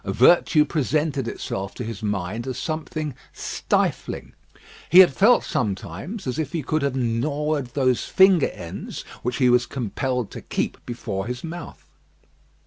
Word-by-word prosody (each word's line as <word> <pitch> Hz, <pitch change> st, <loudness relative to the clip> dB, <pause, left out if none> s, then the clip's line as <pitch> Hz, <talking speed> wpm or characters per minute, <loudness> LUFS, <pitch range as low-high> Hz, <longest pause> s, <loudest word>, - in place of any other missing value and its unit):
Virtue 150 Hz, -, +5 dB
presented 150 Hz, -2 st, 0 dB
itself 95 Hz, -3 st, -4 dB
to -, -, -5 dB
his 110 Hz, -3 st, -6 dB
mind 105 Hz, +3 st, -3 dB
as 130 Hz, -1 st, -3 dB
something 155 Hz, -2 st, -3 dB, 0.2 s
stifling. -, -, -2 dB, 0.6 s
He 175 Hz, -, +5 dB
had 185 Hz, -6 st, +9 dB
felt, 235 Hz, -, +5 dB
sometimes, 125 Hz, -, -3 dB
as 130 Hz, +3 st, -2 dB
if 155 Hz, 0 st, -3 dB
he 165 Hz, -3 st, -2 dB
could 155 Hz, +3 st, 0 dB
have 140 Hz, -2 st, 0 dB
gnawed 135 Hz, +3 st, -1 dB
those 130 Hz, -3 st, +2 dB
finger 190 Hz, -5 st, +5 dB
ends 85 Hz, -2 st, -7 dB, 0.2 s
which 125 Hz, 0 st, -2 dB
he 125 Hz, -, +4 dB
was 120 Hz, 0 st, +4 dB
compelled 125 Hz, -1 st, -2 dB
to -, -, -7 dB
keep -, -, -3 dB
before 105 Hz, -4 st, -4 dB
his 125 Hz, +1 st, -5 dB
mouth. 170 Hz, 0 st, -8 dB
130 Hz, 145 wpm, -23 LUFS, 115-155 Hz, 0.6 s, had